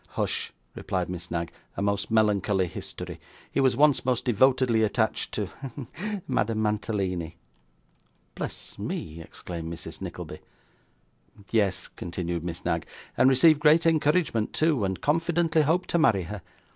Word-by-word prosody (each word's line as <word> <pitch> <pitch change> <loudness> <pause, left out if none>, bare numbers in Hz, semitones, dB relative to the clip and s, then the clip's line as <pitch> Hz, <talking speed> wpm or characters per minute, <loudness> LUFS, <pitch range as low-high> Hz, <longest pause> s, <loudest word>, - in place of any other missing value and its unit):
'Hush!' - - -1 0.2
replied 95 -2 -2
Miss 90 -1 -6
Knag; 85 -1 -2 0.3
'a - - -1
most 100 0 0
melancholy 105 -3 +2
history. 85 - -7 0.3
He - - 0
was 130 -2 +3
once 145 -1 +4
most 125 -2 0
devotedly 125 -1 +3
attached 110 +1 0
to 105 - -1
hem 135 +5 -8
to 205 +1 -4
Madame 110 0 0
Mantalini.' 100 -6 -1 1.0
'Bless - - -6
me!' 80 +1 -4
exclaimed 85 0 -7
Mrs. 85 - -8
Nickleby. - - -6 1.1
'Yes,' 100 -5 +1
continued 85 -1 -4
Miss 85 -1 -5
Knag, - - 0 0.3
'and 130 - +5
received 145 +4 +6
great 155 +2 +5
encouragement 150 -7 +2
too, 155 -8 +2
and 95 -1 -2
confidently 165 +1 +2
hoped 165 +5 +1
to 170 - +3
marry 110 - +4
her. 100 +3 -6
110 Hz, 140 wpm, -27 LUFS, 95-150 Hz, 1.1 s, received